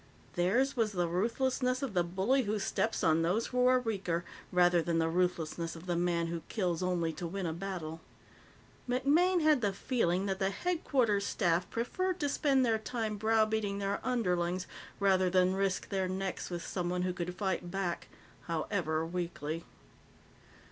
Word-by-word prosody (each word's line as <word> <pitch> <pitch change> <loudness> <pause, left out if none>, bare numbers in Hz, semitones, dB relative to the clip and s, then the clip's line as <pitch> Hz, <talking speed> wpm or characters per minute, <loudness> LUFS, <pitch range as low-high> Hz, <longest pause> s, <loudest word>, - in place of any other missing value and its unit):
Theirs 235 +11 +2
was 220 -4 +1
the 175 -2 +1
ruthlessness 255 +7 0
of 260 -7 -3
the 175 -2 +3
bully 190 +10 +1
who 210 +1 0
steps 220 +2 -1
on 160 -1 +4
those 185 +8 +1
who 250 0 +4
are 255 0 +5
weaker 195 -8 -2 0.3
rather 175 -1 +4
than 165 0 0
the 165 0 +2
ruthlessness 170 -1 -1
of 165 +2 -10
the 175 -1 -1
man 170 -1 +1
who 165 0 -3
kills 180 -6 -1
only 175 -3 0
to 175 +1 -5
win 190 +2 -4
a 160 - -1
battle. 165 -3 -5 0.9
MacMaine 310 +8 +3
had 305 -4 +4
the 205 -2 +2
feeling 195 -4 0
that 195 -1 -2
the 195 -1 +2
Headquarters 240 - +1
Staff 175 -3 +1
preferred 365 +11 -1
to 290 - 0
spend 275 -2 +2
their 225 -2 +2
time 220 -1 -3
browbeating 220 -1 +1
their 200 0 -1
underlings 180 -7 0 0.3
rather 190 -2 +3
than 185 0 +3
risk 195 -1 -1
their 190 -2 0
necks 190 0 -3
with 175 -1 -4
someone 180 0 -2
who 180 0 0
could 180 0 -4
fight 190 -3 -2
back, 185 -2 -2 0.4
however 160 -1 -1
weakly. 165 -2 -4
190 Hz, 165 wpm, -32 LUFS, 175-225 Hz, 0.9 s, are